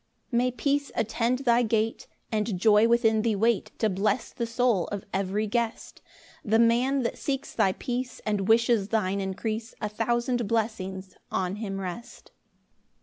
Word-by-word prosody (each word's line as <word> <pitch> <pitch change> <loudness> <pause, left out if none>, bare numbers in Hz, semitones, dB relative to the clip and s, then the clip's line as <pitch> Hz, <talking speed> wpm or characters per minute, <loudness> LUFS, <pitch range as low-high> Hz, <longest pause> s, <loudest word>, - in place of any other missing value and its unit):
4 235 - +1
May 250 +1 +2
peace 280 +3 -1
attend 230 +2 0
thy 240 0 +4
gate, 225 -1 0 0.2
And 215 -2 -1
joy 215 +2 +5
within 225 -2 +3
thee 225 -1 +1
wait 225 +1 +1
To 220 - +2
bless 205 +3 0
the 235 - -3
soul 230 -5 +1
of 205 -2 -5
every 195 +2 0
guest! 230 +1 -3 0.4
The 220 +1 +2
man 245 +4 +3
that 235 - -3
seeks 270 -2 -3
thy 190 - +2
peace, 250 +3 -4
And 205 -3 0
wishes 225 -2 +3
thine 200 -3 0
increase, 215 +4 -4
A 210 - -2
thousand 240 +2 0
blessings 195 -4 -2
on 190 +1 -1
him 195 -3 -4
rest! 190 +6 -7
225 Hz, 155 wpm, -27 LUFS, 200-235 Hz, 0.4 s, joy